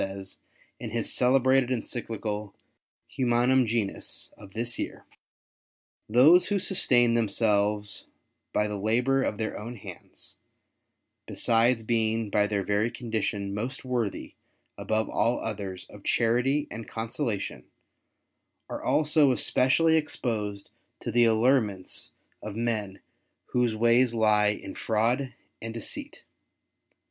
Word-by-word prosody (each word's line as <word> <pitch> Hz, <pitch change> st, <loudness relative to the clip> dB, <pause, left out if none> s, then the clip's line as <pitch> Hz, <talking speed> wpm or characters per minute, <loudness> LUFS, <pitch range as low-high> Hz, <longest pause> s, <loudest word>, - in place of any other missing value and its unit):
says, 95 Hz, 0 st, -6 dB, 0.4 s
in -, -, -5 dB
his -, -, -2 dB
celebrated 130 Hz, 0 st, +3 dB
Encyclical 110 Hz, -4 st, -4 dB, 0.5 s
Humanum 125 Hz, 0 st, +2 dB
Genus 110 Hz, -3 st, -3 dB
of 100 Hz, -1 st, -15 dB
this 120 Hz, +1 st, -3 dB
year, -, -, -5 dB
'^ -, -, -24 dB, 0.9 s
Those 145 Hz, +11 st, +6 dB
who 205 Hz, -, +1 dB
sustain 125 Hz, -, +3 dB
themselves 105 Hz, -2 st, +1 dB, 0.4 s
by 105 Hz, -, +1 dB
the 105 Hz, -1 st, -4 dB
labour 125 Hz, +6 st, +2 dB
of 105 Hz, -, -1 dB
their 110 Hz, -1 st, -3 dB
own 115 Hz, +4 st, -7 dB
hands, 105 Hz, -, -10 dB, 0.9 s
besides 115 Hz, 0 st, +2 dB
being 110 Hz, -1 st, 0 dB
by 105 Hz, -1 st, +3 dB
their 100 Hz, -2 st, -1 dB
very 105 Hz, +4 st, +1 dB
condition 110 Hz, -5 st, -3 dB
most 120 Hz, +7 st, -4 dB
worthy 120 Hz, -5 st, -2 dB, 0.4 s
above 110 Hz, 0 st, -1 dB
all 120 Hz, +2 st, +1 dB
others 100 Hz, -4 st, -5 dB
of 105 Hz, -1 st, -14 dB
charity 125 Hz, +5 st, +1 dB
end 115 Hz, -, -7 dB
consolation, 115 Hz, -2 st, -4 dB, 1.0 s
are -, -, -5 dB
also 150 Hz, -2 st, +3 dB
especially 160 Hz, +6 st, +3 dB
exposed 105 Hz, -9 st, -3 dB, 0.3 s
to -, -, -3 dB
the 120 Hz, -1 st, +4 dB
allurements 110 Hz, -4 st, +1 dB, 0.3 s
of 105 Hz, -1 st, -6 dB
men 110 Hz, -4 st, -2 dB, 0.5 s
whose 120 Hz, -3 st, +2 dB
ways 120 Hz, +2 st, +3 dB
lie 105 Hz, -2 st, +4 dB
in 105 Hz, -, -3 dB
fraud 120 Hz, +5 st, 0 dB, 0.3 s
and 115 Hz, 0 st, -6 dB
deceit. 115 Hz, -, -7 dB
115 Hz, 115 wpm, -27 LUFS, 105-125 Hz, 1.0 s, Those